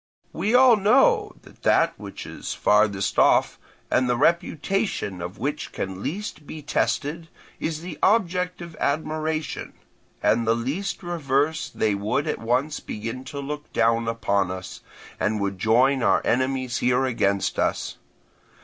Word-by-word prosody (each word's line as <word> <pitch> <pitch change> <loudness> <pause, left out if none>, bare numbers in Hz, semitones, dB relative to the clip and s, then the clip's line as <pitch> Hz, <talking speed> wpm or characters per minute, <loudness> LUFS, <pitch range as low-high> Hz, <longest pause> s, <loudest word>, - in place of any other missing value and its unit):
We 205 +8 0
all 250 -3 +7
know 275 - +4
that - - -18
that - - +3
which - - -9
is - - -6
farthest 105 -2 +2
off, - - +4 0.3
and 125 -1 +2
the 120 - +2
reputation 165 - 0
of 90 +4 -6
which 145 +5 -3
can 95 0 -5
least 175 - -5
be 155 -1 -8
tested, 155 +3 -1 0.3
is 155 -1 -3
the 175 -3 -8
object 180 -4 +1
of 170 -2 -10
admiration; 155 +1 -2 0.5
at 120 - +3
the 115 0 +2
least 150 +14 -3
reverse 160 -1 0
they 110 -2 0
would 105 +8 -1
at - - -2
once 125 +7 0
begin 115 +4 -6
to 145 - -6
look 150 +1 -6
down 115 0 +2
upon 100 -4 0
us, 95 0 -7 0.4
and 105 0 0
would 100 -1 -2
join 125 +5 +3
our - - +3
enemies 130 0 0
here 125 +1 +2
against 100 -6 0
us. - - -1
140 Hz, 145 wpm, -24 LUFS, 115-165 Hz, 0.5 s, all